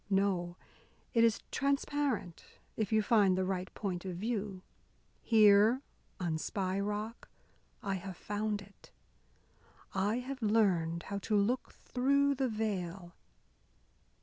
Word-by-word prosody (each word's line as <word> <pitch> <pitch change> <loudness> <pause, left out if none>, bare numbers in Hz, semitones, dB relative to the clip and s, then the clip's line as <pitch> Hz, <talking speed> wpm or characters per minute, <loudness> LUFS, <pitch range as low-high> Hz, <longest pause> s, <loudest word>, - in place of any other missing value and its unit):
No, 190 -3 +1 0.6
it 230 -2 +5
is 230 -2 +3
transparent, 275 - -1 0.3
if 215 -2 -2
you 215 -1 +3
find 200 -4 +4
the 185 - +1
right 185 -1 -2
point 185 -4 -3
of 185 -2 -4
view. 200 -2 -3 0.6
Here, 215 +3 +5 0.4
on 165 -3 -1
Spy 190 +3 -2
Rock, 210 +3 -4 0.5
I 195 - -1
have 190 -1 -5
found 210 0 -2
it. 200 0 -19 1.0
I 200 +3 +1
have 260 +1 -5
learned 185 -7 +2
how 200 0 -4
to 210 +1 0
look 235 +5 0
through 280 +3 +2
the 265 -1 0
veil. 190 -5 -3
205 Hz, 120 wpm, -33 LUFS, 185-225 Hz, 1.0 s, it